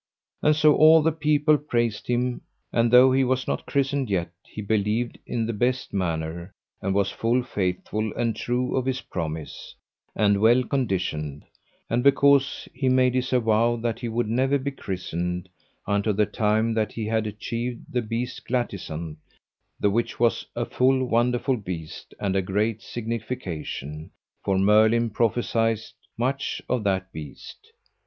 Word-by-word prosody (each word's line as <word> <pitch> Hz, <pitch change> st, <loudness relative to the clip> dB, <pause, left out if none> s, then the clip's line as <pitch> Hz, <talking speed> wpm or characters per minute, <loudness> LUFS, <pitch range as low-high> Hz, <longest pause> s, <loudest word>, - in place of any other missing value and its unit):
And 150 Hz, 0 st, +4 dB
so 155 Hz, -1 st, +5 dB
all 155 Hz, 0 st, +7 dB
the 165 Hz, -, +3 dB
people 150 Hz, -1 st, +2 dB
praised 120 Hz, -6 st, -1 dB
him; 125 Hz, 0 st, 0 dB, 0.3 s
and 115 Hz, 0 st, +3 dB
though 125 Hz, +2 st, +7 dB
he 135 Hz, +1 st, +3 dB
was 130 Hz, 0 st, 0 dB
not -, -, -3 dB
christened 140 Hz, -2 st, 0 dB
yet 85 Hz, -4 st, -1 dB
he -, -, -11 dB
believed 105 Hz, +3 st, -1 dB
in 115 Hz, -2 st, -1 dB
the 115 Hz, -, -2 dB
best 125 Hz, +4 st, -1 dB
manner, 85 Hz, -1 st, -3 dB, 0.3 s
and 95 Hz, 0 st, -1 dB
was 100 Hz, -1 st, +2 dB
full 120 Hz, +2 st, +1 dB
faithful 105 Hz, 0 st, -2 dB
and 115 Hz, -2 st, 0 dB
true 125 Hz, +1 st, -1 dB
of 130 Hz, -1 st, 0 dB
his 130 Hz, 0 st, 0 dB
promise, 80 Hz, -1 st, -6 dB, 0.4 s
and 100 Hz, -1 st, +3 dB
well 120 Hz, +3 st, +5 dB
conditioned; 90 Hz, -, -2 dB, 0.4 s
and 120 Hz, +2 st, +1 dB
because 140 Hz, 0 st, +4 dB
he 130 Hz, 0 st, 0 dB
made 130 Hz, -1 st, +3 dB
his 130 Hz, 0 st, -1 dB
avow 115 Hz, -1 st, +3 dB
that 115 Hz, -1 st, -3 dB
he 120 Hz, -, -4 dB
would 115 Hz, 0 st, -1 dB
never 130 Hz, +5 st, +2 dB
be 140 Hz, +1 st, -3 dB
christened 90 Hz, -5 st, -4 dB, 0.4 s
unto 100 Hz, +1 st, +1 dB
the 105 Hz, +1 st, +2 dB
time 110 Hz, +2 st, +1 dB
that 110 Hz, -1 st, -1 dB
he 110 Hz, -, -4 dB
had 110 Hz, 0 st, 0 dB
achieved 115 Hz, +3 st, -4 dB
the 125 Hz, -, -1 dB
beast 115 Hz, +2 st, -4 dB
Glatisant, 85 Hz, -10 st, -3 dB, 0.6 s
the 100 Hz, -, +2 dB
which 115 Hz, +3 st, -1 dB
was 120 Hz, -1 st, +1 dB
a 120 Hz, -, -1 dB
full 130 Hz, +1 st, +2 dB
wonderful 125 Hz, +2 st, +1 dB
beast, 90 Hz, -6 st, -7 dB
and 100 Hz, -2 st, -1 dB
a 95 Hz, -, +3 dB
great 105 Hz, +4 st, -1 dB
signification; 95 Hz, -, -5 dB, 0.3 s
for 95 Hz, -1 st, +1 dB
Merlin 110 Hz, +4 st, +4 dB
prophesied 115 Hz, 0 st, +1 dB, 0.4 s
much 135 Hz, +4 st, -1 dB
of 125 Hz, -4 st, 0 dB
that 95 Hz, -1 st, 0 dB
beast. 75 Hz, -2 st, -10 dB
115 Hz, 155 wpm, -25 LUFS, 100-125 Hz, 0.6 s, all